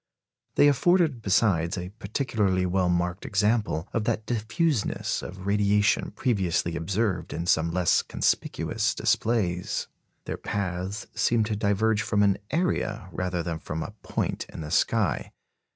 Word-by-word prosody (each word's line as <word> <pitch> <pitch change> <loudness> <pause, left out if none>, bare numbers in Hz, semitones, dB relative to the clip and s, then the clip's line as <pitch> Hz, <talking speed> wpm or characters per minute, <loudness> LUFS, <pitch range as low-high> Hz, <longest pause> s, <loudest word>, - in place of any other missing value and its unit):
They 145 - +6
afforded 155 -2 +3
besides 95 -3 +2
a 90 0 -4
particularly 105 -3 -1
well 90 0 +1
marked 90 +1 0
example 105 -5 +1
of 110 -2 0
that 105 - -1
diffuseness 120 +4 0
of 95 +1 -8
radiation 105 0 +2
previously 95 -7 0
observed 90 0 -1
in 85 - -3
some 85 -1 +2
less 90 +1 +3
conspicuous - - 0
displays. 95 -6 0 0.4
Their - - -4
paths 95 +1 -3
seemed 115 -2 +2
to 105 0 -2
diverge 105 +1 +1
from 105 -1 +1
an 100 -1 +3
area 110 - -1
rather 90 -1 -2
than 85 -1 -3
from 80 0 -4
a 105 - -8
point - - -2
in - - -7
the 75 -1 -6
sky. - - +1
100 Hz, 135 wpm, -26 LUFS, 90-110 Hz, 0.4 s, They